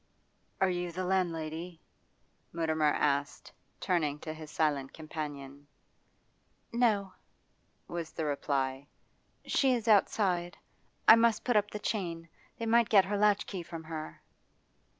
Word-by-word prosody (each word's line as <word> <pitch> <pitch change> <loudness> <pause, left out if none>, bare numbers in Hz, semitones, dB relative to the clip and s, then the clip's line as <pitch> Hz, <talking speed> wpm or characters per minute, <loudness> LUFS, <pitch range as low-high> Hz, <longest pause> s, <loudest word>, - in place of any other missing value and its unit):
'Are 190 - +4
you 175 -1 -3
the 185 +2 -3
landlady?' 170 -2 -2 0.7
Mutimer 160 -2 +1
asked, 145 -1 -1 0.3
turning 155 -6 0
to 155 - -5
his 155 -1 -10
silent 145 -4 0
companion. 145 -3 -7 1.1
'No,' 210 -5 +2 0.7
was 170 -2 -5
the 160 - -3
reply. 140 -1 -1 0.6
'She 265 -2 +3
is 230 -1 -4
outside, 190 -4 +2 0.5
I - - +11
must 230 -1 +3
put 245 - +1
up 210 0 +3
the 210 - -5
chain. 170 -6 -3 0.3
They 230 - -4
might 230 0 +3
get 195 -4 +6
her 205 +2 -2
latchkey 205 -2 +1
from 165 -1 -8
her. 160 -1 -7
170 Hz, 125 wpm, -31 LUFS, 155-205 Hz, 1.1 s, I